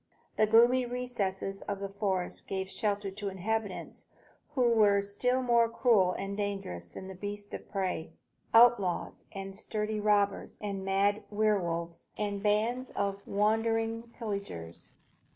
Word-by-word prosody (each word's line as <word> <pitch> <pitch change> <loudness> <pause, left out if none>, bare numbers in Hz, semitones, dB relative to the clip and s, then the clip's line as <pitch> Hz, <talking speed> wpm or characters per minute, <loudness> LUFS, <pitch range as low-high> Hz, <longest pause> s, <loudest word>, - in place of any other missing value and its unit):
The 215 - +4
gloomy 240 +3 +5
recesses 210 -6 -3
of 200 -1 -2
the 200 - -3
forest 195 -2 -2
gave 190 0 -3
shelter 205 -1 -1
to 200 +1 -4
inhabitants 205 +1 -3 0.5
who 255 - +3
were 205 -3 +5
still 250 +6 +1
more 235 -2 +4
cruel 220 -6 +3
and 195 0 -4
dangerous 195 - -3
than 190 - -8
beasts 205 +1 -6
of - - -7
prey, 185 -5 -2 0.4
outlaws 225 -6 +4
and 195 0 -7
sturdy 215 +1 -3
robbers 205 -1 +1
and 200 -2 -4
mad 200 +2 +2
were 210 0 +2
wolves 170 -1 -4
and 205 -1 -2
bands 225 +5 +1
of 200 0 -1
wandering 225 +2 +1
pillagers. 200 - -6
205 Hz, 135 wpm, -31 LUFS, 195-225 Hz, 0.5 s, gloomy